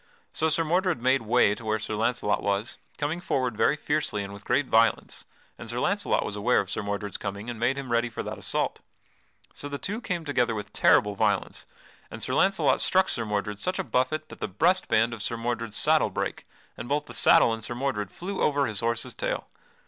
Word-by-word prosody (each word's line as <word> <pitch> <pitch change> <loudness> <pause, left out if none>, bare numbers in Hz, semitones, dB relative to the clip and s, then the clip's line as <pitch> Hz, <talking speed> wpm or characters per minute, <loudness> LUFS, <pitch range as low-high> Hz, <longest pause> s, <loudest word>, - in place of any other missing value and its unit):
So 160 - +2
Sir 160 +2 +2
Mordred 175 0 +1
made 130 +3 +2
way 115 -2 +3
to 115 - -9
where 110 0 0
Sir 110 0 -5
Launcelot 110 -1 0
was, 100 +3 -2 0.2
coming 155 +4 -2
forward 130 -9 -1
very 140 - +3
fiercely 150 -9 -1
and 100 0 -7
with 100 0 -11
great 145 - +2
violence, 115 -2 +1 0.3
and - - -8
Sir - - -3
Launcelot - - +1
was - - -4
aware - - +2
of - - -3
Sir - - -2
Mordred's 100 0 -3
coming 100 +3 -5
and 115 - -8
made 125 +4 +1
him 135 -3 -5
ready 120 +1 +2
for 115 - -5
that - - -6
assault. - - -1 0.7
So 145 - -7
the 140 - -4
two 210 - -3
came 175 -7 -3
together 125 -6 +1
with 105 -1 -6
terrible 105 0 +4
violence 100 -1 -1 0.4
and - - -7
Sir - - -2
Launcelot 195 0 +3
struck 190 0 +3
Sir 115 - +1
Mordred 105 -1 -2
such 185 - -1
a 190 - -1
buffet 155 +2 -1
that - - -11
the - - -2
breast 180 - +1
band 115 +2 +2
of 115 - -7
Sir 115 - -2
Mordred's 115 -2 -3
saddle - - +4
brake, - - -4 0.3
and 120 - -8
both 145 +1 0
the 120 - -10
saddle 115 -1 +5
and 115 -1 -6
Sir 120 - -2
Mordred 120 -6 -2
flew 190 - -5
over 145 -1 +2
his 110 -5 -2
horse's 115 +1 0
tail. - - -3
120 Hz, 215 wpm, -27 LUFS, 110-150 Hz, 0.7 s, saddle